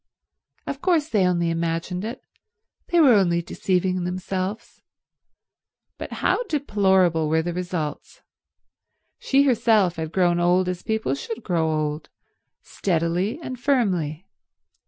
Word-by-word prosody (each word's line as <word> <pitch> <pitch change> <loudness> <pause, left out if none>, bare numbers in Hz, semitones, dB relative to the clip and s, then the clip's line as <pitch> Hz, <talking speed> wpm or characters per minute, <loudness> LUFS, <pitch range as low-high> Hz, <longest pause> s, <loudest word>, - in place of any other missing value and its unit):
Of - - -5
course 325 -5 +1
they 195 -8 +2
only 170 -2 +1
imagined 165 +2 -2
it, 230 +4 -6 0.6
they 345 - +2
were 280 -6 +7
only 175 -5 +2
deceiving 185 0 -1
themselves; 185 +4 -4 1.2
but - - -6
how - - +3
deplorable 190 - +2
were 160 +1 +2
the 175 +1 -3
results. 175 -4 -5 1.0
She 275 +1 +3
herself 220 -9 +3
had 160 -1 -4
grown 175 -2 +2
old 180 +1 +2
as 180 -1 -3
people 220 -10 -1
should 220 +12 -6
grow 165 -5 0
old—steadily 165 - -3
and 255 -1 -6
firmly. 190 - 0
180 Hz, 115 wpm, -23 LUFS, 170-220 Hz, 1.2 s, were